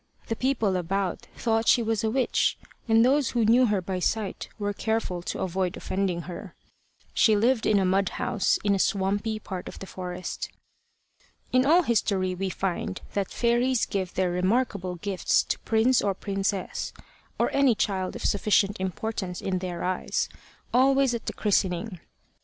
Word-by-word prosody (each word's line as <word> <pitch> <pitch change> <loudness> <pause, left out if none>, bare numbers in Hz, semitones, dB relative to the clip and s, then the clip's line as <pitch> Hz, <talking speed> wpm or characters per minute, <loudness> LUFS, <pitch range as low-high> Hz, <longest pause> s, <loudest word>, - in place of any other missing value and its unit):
The 225 - 0
people 225 -7 +1
about 185 +2 -2
thought 225 -1 0
she 240 - +5
was 225 0 0
a 220 - +2
witch, 255 +2 +1 0.3
and 225 +1 +5
those 270 0 +3
who 235 -2 +1
knew 240 +3 +5
her 205 -3 0
by 185 0 -3
sight 205 +1 -2
were 205 -1 -2
careful 220 -4 -1
to - - -4
avoid 185 0 -1
offending 185 -3 -1
her. 180 +1 -8 0.6
She 220 - +4
lived 230 +3 +2
in 210 - +4
a 195 - +2
mud 190 +1 +2
house, 210 - +1
in 200 -1 +3
a 195 - 0
swampy 205 +3 0
part 190 -4 -6
of - - -8
the - - -7
forest. 180 -1 -5 1.0
In 255 +1 +4
all 345 +4 +6
history 195 - +1
we 190 +1 -2
find 190 +1 -3
that 200 -2 -1
fairies 240 +1 +2
give 190 -2 -3
their 185 -1 +1
remarkable 185 0 0
gifts 190 +1 +1
to - - -3
prince 235 +3 +3
or 200 -2 0
princess, 195 -1 -2 0.4
or - - +1
any 275 -4 +4
child 190 -3 -1
of - - -6
sufficient 205 0 +2
importance 190 -1 -3
in 185 -1 -1
their 180 -2 -4
eyes, 185 0 -1 0.4
always 270 0 +4
at 235 - -5
the - - -2
christening. 190 -2 0
200 Hz, 165 wpm, -26 LUFS, 185-225 Hz, 1.0 s, all